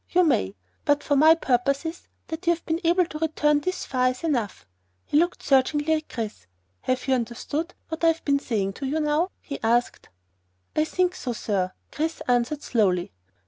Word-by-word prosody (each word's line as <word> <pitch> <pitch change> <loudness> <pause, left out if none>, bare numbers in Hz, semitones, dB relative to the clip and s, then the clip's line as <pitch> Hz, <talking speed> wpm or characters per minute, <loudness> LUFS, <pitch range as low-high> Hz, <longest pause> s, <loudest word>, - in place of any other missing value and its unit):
You 360 +1 +4
may. 100 - +1 0.3
But 290 0 +2
for 285 - +1
my 315 +3 +7
purposes, 275 +3 -1 0.2
that 330 +2 -6
you 345 - +6
have 335 - -19
been 325 +2 -1
able 345 +2 +4
to 305 -2 -7
return 300 -2 +2
this 370 +5 -3
far 255 -1 +2
is 255 +5 -6
enough." 245 - -1 0.4
He - - -4
looked 345 +4 +2
searchingly 295 +3 +3
at 310 -1 -2
Chris. 215 - -5 0.3
"Have 255 0 -1
you 265 - +3
understood 260 +7 -2
what 320 +1 -5
I - - +6
have 330 0 +1
been 280 -1 +3
saying 210 -8 -1
up 195 - -8
to 280 +3 -1
now?" 305 +4 +1
he 280 - -6
asked. 235 +2 0 0.7
"I 305 - +3
think 365 +2 +1
so, 250 -8 -4
sir," 190 -4 -1 0.2
Chris 320 +2 -2
answered 245 +4 +1
slowly. 185 -7 +1
290 Hz, 185 wpm, -25 LUFS, 245-320 Hz, 0.7 s, my